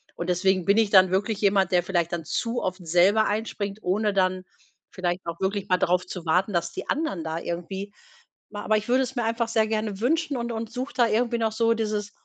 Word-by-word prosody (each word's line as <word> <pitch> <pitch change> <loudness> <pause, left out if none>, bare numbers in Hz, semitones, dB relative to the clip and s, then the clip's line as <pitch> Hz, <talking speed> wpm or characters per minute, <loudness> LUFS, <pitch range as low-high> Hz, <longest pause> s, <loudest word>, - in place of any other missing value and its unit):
und 170 - -4
deswegen 185 +1 +2
bin 200 +1 +3
ich 220 -2 +3
dann 185 -2 +7
wirklich 195 +3 -1
jemand, 195 -2 +3
der 180 - +4
vielleicht 175 -2 -1
dann 170 -2 -2
zu 235 +8 -2
oft 185 -1 -4
selber 185 +6 +4
einspringt, 205 -1 -3
ohne 210 +3 0
dann 185 -1 +1 0.5
vielleicht 180 -1 -2
auch 170 0 -5
wirklich 195 +1 -2
mal 185 - +4
drauf 180 +2 +1
zu 180 -1 -7
warten, 185 +5 +2
dass 170 -1 0
die - - -7
anderen 290 - -2
da 160 +1 -3
irgendwie 190 +4 -5 0.6
ma 205 0 -7
aber 215 - +3
ich 215 +1 -2
würde 255 +2 +4
es 265 +1 -6
mir 240 - -1
einfach 230 +1 0
sehr 220 -1 +1
gerne 215 -2 -2
wünschen 315 +3 +1
und 235 -1 -3
und 225 -1 -4
suche 255 +2 -4
da 240 - +5
irgendwie 235 +2 +1
noch 225 -1 0
so 230 +1 +2
dieses 210 -2 -2
205 Hz, 225 wpm, -25 LUFS, 185-225 Hz, 0.6 s, dann